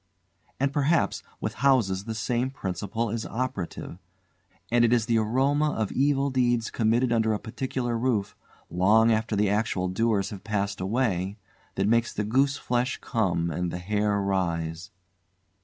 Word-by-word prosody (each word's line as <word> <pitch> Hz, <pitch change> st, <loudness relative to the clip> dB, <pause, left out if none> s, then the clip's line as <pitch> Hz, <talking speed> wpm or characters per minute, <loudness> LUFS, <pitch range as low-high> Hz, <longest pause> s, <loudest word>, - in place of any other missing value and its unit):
And, 140 Hz, +1 st, +1 dB
perhaps, 150 Hz, +4 st, +1 dB, 0.2 s
with -, -, -3 dB
houses 110 Hz, -9 st, +3 dB
the 115 Hz, -1 st, -4 dB
same 120 Hz, +4 st, -1 dB
principle 105 Hz, -1 st, -3 dB
is 115 Hz, 0 st, -2 dB
operative, 100 Hz, -7 st, -4 dB, 0.7 s
and 120 Hz, 0 st, +4 dB
it 120 Hz, -, +4 dB
is 120 Hz, -3 st, +3 dB
the 115 Hz, -1 st, +2 dB
aroma 135 Hz, +7 st, +1 dB
of 110 Hz, -2 st, -2 dB
evil 140 Hz, 0 st, +1 dB
deeds 120 Hz, -3 st, +1 dB
committed 115 Hz, +2 st, +1 dB
under 110 Hz, -1 st, +2 dB
a 105 Hz, -, -2 dB
particular 120 Hz, +1 st, -3 dB
roof, 115 Hz, -5 st, 0 dB, 0.4 s
long 110 Hz, +6 st, +4 dB
after 110 Hz, 0 st, 0 dB
the 100 Hz, -1 st, +2 dB
actual 105 Hz, -3 st, 0 dB
doers 105 Hz, +1 st, 0 dB
have 100 Hz, -3 st, -8 dB
passed 100 Hz, -2 st, -2 dB
away, 100 Hz, -2 st, -1 dB, 0.4 s
that 95 Hz, -, +1 dB
makes 115 Hz, +1 st, +2 dB
the 105 Hz, -, -2 dB
gooseflesh 130 Hz, +1 st, +1 dB
come 85 Hz, -8 st, 0 dB
and 90 Hz, +3 st, -2 dB
the 90 Hz, -, -4 dB
hair 105 Hz, +2 st, 0 dB
rise. 85 Hz, -3 st, -2 dB
110 Hz, 150 wpm, -26 LUFS, 100-125 Hz, 0.7 s, and